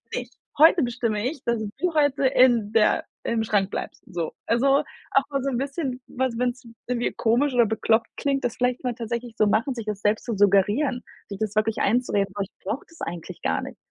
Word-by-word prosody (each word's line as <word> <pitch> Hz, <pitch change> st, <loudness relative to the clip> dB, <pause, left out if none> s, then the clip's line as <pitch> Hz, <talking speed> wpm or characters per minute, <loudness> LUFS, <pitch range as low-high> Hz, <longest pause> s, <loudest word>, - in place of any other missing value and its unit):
nicht! 245 Hz, 0 st, -5 dB, 0.3 s
Heute 320 Hz, 0 st, +7 dB
bestimme 230 Hz, -3 st, -1 dB
ich, 285 Hz, -2 st, -9 dB
dass 235 Hz, -1 st, +1 dB, 0.2 s
du 360 Hz, -1 st, 0 dB
heute 285 Hz, -2 st, +2 dB
in 240 Hz, -5 st, +4 dB
der 220 Hz, -1 st, +3 dB, 0.2 s
im 225 Hz, -1 st, 0 dB
Schrank 205 Hz, -3 st, +1 dB
bleibst. -, -, -5 dB
So.“ 170 Hz, -3 st, -3 dB, 0.2 s
Also, 275 Hz, +5 st, +3 dB, 0.3 s
auch 275 Hz, -, +4 dB
mal 275 Hz, -1 st, -1 dB
so 275 Hz, -, 0 dB
'n 245 Hz, -, -1 dB
bisschen 275 Hz, -1 st, -3 dB
was 255 Hz, -2 st, -2 dB
wenn 250 Hz, 0 st, +2 dB
es 250 Hz, +1 st, -17 dB, 0.2 s
irgendwie 245 Hz, -1 st, 0 dB
komisch 250 Hz, +5 st, +1 dB
oder 240 Hz, -1 st, +5 dB
bekloppt 220 Hz, +1 st, +1 dB
klingt, 275 Hz, -1 st, 0 dB
das 245 Hz, -, -1 dB
vielleicht 250 Hz, +1 st, 0 dB
mal 245 Hz, -2 st, -1 dB
tatsächlich 235 Hz, 0 st, -5 dB
so 215 Hz, -, +4 dB
machen, 230 Hz, +6 st, +1 dB
sich 230 Hz, -3 st, -6 dB
das 210 Hz, -2 st, -4 dB
selbst 210 Hz, +1 st, +1 dB
zu 235 Hz, -, -2 dB
suggerieren, 205 Hz, +7 st, +3 dB, 0.3 s
sich 200 Hz, -, -6 dB
das 215 Hz, -1 st, -2 dB
wirklich 215 Hz, +1 st, +1 dB
einzureden: 200 Hz, -4 st, +1 dB
„Oh, -, -, -1 dB
ich 195 Hz, -, -9 dB
brauche 225 Hz, +8 st, -3 dB
das 330 Hz, -, -18 dB
eigentlich 170 Hz, +1 st, -6 dB
gar 80 Hz, -, 0 dB
nicht. -, -, -8 dB
240 Hz, 210 wpm, -24 LUFS, 215-260 Hz, 0.3 s, Heute